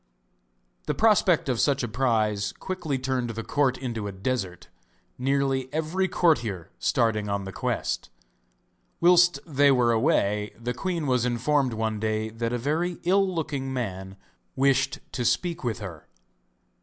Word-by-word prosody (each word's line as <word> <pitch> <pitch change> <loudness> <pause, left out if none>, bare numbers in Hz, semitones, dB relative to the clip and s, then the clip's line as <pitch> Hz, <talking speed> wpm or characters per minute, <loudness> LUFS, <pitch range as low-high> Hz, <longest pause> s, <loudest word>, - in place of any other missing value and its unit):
The 150 - 0
prospect 200 -6 +3
of 125 -4 0
such 140 0 +2
a - - -1
prize 110 -4 0
quickly 175 -7 -3
turned 130 -2 -2
the 115 0 -4
court 135 -1 +1
into 115 -5 -4
a - - -4
desert, 95 -2 -3 0.5
nearly 135 0 0
every 160 +5 0
courtier 115 - +1
starting 110 -3 +1
on 100 0 -1
the 95 - -6
quest. - - -2 0.9
Whilst 175 0 +5
they 145 -3 +3
were 125 -3 +3
away 105 -5 +1
the 120 +1 -3
queen 170 +3 -2
was 125 -3 +2
informed 125 +2 +1
one 110 -1 -2
day 110 0 -1
that 115 +1 -3
a 120 - 0
very 160 +8 -1
ill 195 +2 +3
looking 140 -6 -3
man 95 -6 -4 0.4
wished 135 0 +2
to 125 - -3
speak 170 +6 0
with 120 -3 -1
her. 85 -7 -8
125 Hz, 145 wpm, -26 LUFS, 110-150 Hz, 0.9 s, Whilst